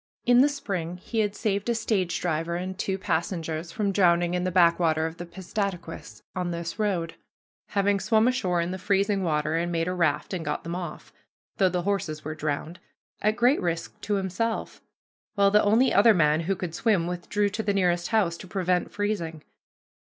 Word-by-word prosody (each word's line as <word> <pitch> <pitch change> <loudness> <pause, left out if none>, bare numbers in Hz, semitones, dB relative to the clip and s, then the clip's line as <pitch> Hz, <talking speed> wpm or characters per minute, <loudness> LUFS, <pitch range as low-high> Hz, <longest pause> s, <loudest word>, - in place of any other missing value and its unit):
In 245 0 +6
the 285 - +5
spring 185 - -4
he 225 +5 -4
had 205 -1 0
saved 205 0 -1
a 235 - +2
stage 195 -6 0
driver 165 0 -1
and 185 +2 -4
two 190 -1 -2
passengers 165 -2 -2
from 200 +1 -1
drowning 175 -2 +3
in 180 0 0
the - - +1
backwater 170 -3 +3
of 165 +1 -5
the 175 - -7
Piscataquis 175 - -5
on 180 -1 -2
this 170 +3 -5
road, 180 -6 0 0.6
having 200 0 +3
swum 220 +2 +3
ashore 185 -9 +1
in 170 +1 -2
the 185 - -5
freezing 200 +1 +1
water 155 -2 0
and 170 +1 0
made 165 0 0
a 180 - -1
raft 160 -2 0
and 175 -3 -3
got - - -3
them 170 - -5
off 175 -3 -6 0.4
though 190 -2 +4
the 180 -1 -2
horses 170 -6 -2
were 155 - -3
drowned 155 +2 -3 0.4
at 215 +1 +2
great 245 +4 +3
risk 170 -1 -3
to 205 - -1
himself, 200 +4 -2 0.5
while 200 -1 +4
the 210 +1 +5
only 225 +6 +4
other 215 +2 +6
man 150 -2 +3
who 180 +4 -1
could 180 -3 -5
swim 200 -3 +2
withdrew 180 +4 -1
to 205 +2 -3
the 205 - 0
nearest 180 -3 +1
house 195 -7 +1
to 185 - -10
prevent 180 -1 0
freezing. 175 -7 -3
180 Hz, 190 wpm, -26 LUFS, 170-205 Hz, 0.6 s, In